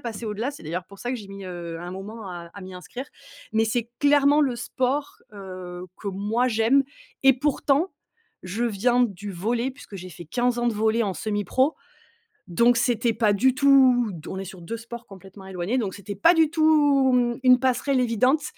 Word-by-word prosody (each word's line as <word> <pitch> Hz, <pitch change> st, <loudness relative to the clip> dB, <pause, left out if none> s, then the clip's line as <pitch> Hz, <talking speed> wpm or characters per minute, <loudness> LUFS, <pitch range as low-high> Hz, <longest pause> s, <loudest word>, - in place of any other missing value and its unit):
passer 230 Hz, -1 st, -6 dB
au-delà, 220 Hz, +6 st, -2 dB
c'est 285 Hz, -, -12 dB
d'ailleurs 170 Hz, +3 st, -4 dB
pour 200 Hz, +2 st, -15 dB
ça 245 Hz, -, -4 dB
que 255 Hz, -, -2 dB
j'ai 205 Hz, -3 st, -10 dB
mis, 195 Hz, -1 st, -9 dB
heu, 170 Hz, -2 st, -6 dB
un 175 Hz, -, -6 dB
moment 205 Hz, +4 st, -8 dB
à 170 Hz, -1 st, -8 dB
à 200 Hz, -, -9 dB
m'y 185 Hz, 0 st, -9 dB
inscrire. 245 Hz, +8 st, -7 dB, 0.5 s
Mais 220 Hz, 0 st, +2 dB
c'est 235 Hz, +1 st, -2 dB
clairement 290 Hz, 0 st, +4 dB
le 265 Hz, -5 st, +1 dB
sport, 260 Hz, +4 st, -2 dB, 0.2 s
heu, 185 Hz, -2 st, -8 dB
que 205 Hz, -, -5 dB
moi 210 Hz, +6 st, 0 dB
j'aime 235 Hz, +4 st, +3 dB, 0.4 s
et 270 Hz, 0 st, +6 dB
pourtant 290 Hz, +5 st, +1 dB, 0.5 s
je 210 Hz, +6 st, -2 dB
viens 240 Hz, +3 st, +2 dB
du 205 Hz, -3 st, -3 dB
volley 230 Hz, +8 st, -1 dB
puisque 260 Hz, -6 st, -12 dB
j'ai 185 Hz, 0 st, -9 dB
fait 175 Hz, 0 st, -10 dB
15 245 Hz, +7 st, 0 dB
ans 240 Hz, -, +1 dB
de 235 Hz, -, 0 dB
volley 220 Hz, +2 st, +1 dB
en 200 Hz, -, -1 dB
semi-pro, 215 Hz, -, 0 dB, 0.7 s
donc 235 Hz, +7 st, +3 dB
c'était 235 Hz, 0 st, +1 dB
pas 215 Hz, -2 st, +2 dB
du 255 Hz, +6 st, +3 dB
tout 260 Hz, -4 st, +5 dB
d 165 Hz, -3 st, -9 dB
on 190 Hz, -, -5 dB
est 195 Hz, -, -4 dB
sur 185 Hz, -1 st, -10 dB
2 200 Hz, +7 st, -5 dB
sports 235 Hz, +1 st, -9 dB
complètement 195 Hz, 0 st, -13 dB
éloignés 190 Hz, +6 st, -2 dB
donc 200 Hz, -5 st, -2 dB
c'était 200 Hz, 0 st, -7 dB
pas 335 Hz, -, +5 dB
du 320 Hz, -2 st, +4 dB
tout 295 Hz, -4 st, +4 dB
mmh, 240 Hz, -1 st, +2 dB
une 250 Hz, 0 st, +7 dB
passerelle 260 Hz, +1 st, +1 dB
évidente. 250 Hz, +5 st, +2 dB
230 Hz, 200 wpm, -24 LUFS, 195-255 Hz, 0.7 s, une